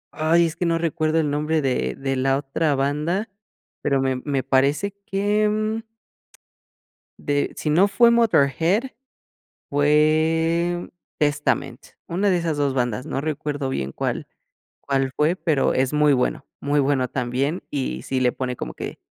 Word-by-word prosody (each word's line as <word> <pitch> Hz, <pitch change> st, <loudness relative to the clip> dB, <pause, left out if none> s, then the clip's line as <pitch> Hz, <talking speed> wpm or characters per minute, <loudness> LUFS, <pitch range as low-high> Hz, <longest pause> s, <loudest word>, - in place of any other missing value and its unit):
ay, 165 Hz, +2 st, +3 dB
es 165 Hz, -1 st, -3 dB
que 175 Hz, -, -1 dB
no 165 Hz, -, +2 dB
recuerdo 165 Hz, -1 st, 0 dB
el 150 Hz, -2 st, 0 dB
nombre 150 Hz, +2 st, 0 dB
de 65 Hz, -, 0 dB
de 135 Hz, 0 st, -2 dB
la 135 Hz, +1 st, +2 dB
otra 145 Hz, +2 st, 0 dB
banda, 150 Hz, +10 st, -1 dB, 0.5 s
pero, 140 Hz, -2 st, +1 dB
me 130 Hz, -1 st, 0 dB
me 140 Hz, -3 st, 0 dB
parece 140 Hz, +9 st, +2 dB
que, 205 Hz, +2 st, +1 dB
mm 215 Hz, +1 st, -1 dB, 1.4 s
de 145 Hz, 0 st, -1 dB
si 155 Hz, -, -3 dB
no 180 Hz, +7 st, +4 dB
fue 235 Hz, +3 st, +5 dB
Motörhead, 210 Hz, -, +2 dB, 0.8 s
fue 160 Hz, +4 st, +2 dB, 0.3 s
Testament, 145 Hz, 0 st, 0 dB, 0.2 s
una 195 Hz, +4 st, 0 dB
de 180 Hz, -, +3 dB
esas 165 Hz, -3 st, -1 dB
2 140 Hz, -2 st, +1 dB
bandas, 125 Hz, 0 st, -1 dB
no 135 Hz, -, -3 dB
recuerdo 145 Hz, -2 st, -3 dB
bien 70 Hz, -, -3 dB
cuál -, -, -3 dB, 0.5 s
cuál 135 Hz, -1 st, -1 dB
fue, 155 Hz, +4 st, +2 dB
pero 150 Hz, -7 st, +1 dB
es 130 Hz, +2 st, +1 dB
muy 150 Hz, -1 st, +4 dB
bueno, 125 Hz, +1 st, 0 dB
muy 145 Hz, +1 st, 0 dB
bueno 135 Hz, -2 st, +1 dB
también, 130 Hz, +7 st, -2 dB
y 135 Hz, -3 st, -3 dB
sí 130 Hz, -, -2 dB
le 125 Hz, -1 st, +3 dB
pone 125 Hz, -1 st, -3 dB
como -, -, -6 dB
que -, -, -7 dB
150 Hz, 155 wpm, -23 LUFS, 135-170 Hz, 1.4 s, fue